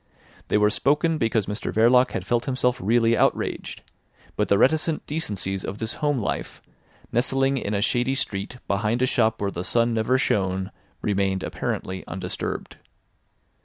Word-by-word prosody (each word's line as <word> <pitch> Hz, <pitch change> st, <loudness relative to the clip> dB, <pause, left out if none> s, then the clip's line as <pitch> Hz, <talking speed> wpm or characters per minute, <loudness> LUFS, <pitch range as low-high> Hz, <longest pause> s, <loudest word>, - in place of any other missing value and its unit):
They -, -, +2 dB
were 105 Hz, 0 st, +4 dB
spoken 155 Hz, +6 st, +1 dB
because 110 Hz, -4 st, +1 dB
Mr 105 Hz, +2 st, -4 dB
Verloc 125 Hz, +3 st, +4 dB
had 90 Hz, -, -3 dB
felt 120 Hz, +3 st, 0 dB
himself 125 Hz, -2 st, 0 dB
really 115 Hz, +3 st, +3 dB
outraged; -, -, -1 dB, 0.5 s
but -, -, 0 dB
the 100 Hz, -, +4 dB
reticent 155 Hz, +6 st, +2 dB
decencies 100 Hz, -, -2 dB
of 100 Hz, -, -5 dB
this 110 Hz, +1 st, -3 dB
home 145 Hz, -2 st, +2 dB
life, 110 Hz, -, -3 dB, 0.5 s
nestling 135 Hz, +3 st, +1 dB
in 105 Hz, -2 st, -2 dB
a 100 Hz, -, +1 dB
shady 125 Hz, +3 st, +1 dB
street 110 Hz, -2 st, -3 dB
behind 105 Hz, +5 st, 0 dB
a -, -, +5 dB
shop 110 Hz, -3 st, +1 dB
where 100 Hz, -1 st, -1 dB
the 90 Hz, -, -4 dB
sun 115 Hz, +3 st, +2 dB
never 115 Hz, +3 st, +2 dB
shone, 95 Hz, -5 st, 0 dB, 0.3 s
remained 95 Hz, -2 st, 0 dB
apparently 95 Hz, 0 st, -3 dB
undisturbed. 90 Hz, 0 st, -5 dB
115 Hz, 155 wpm, -24 LUFS, 100-130 Hz, 0.5 s, a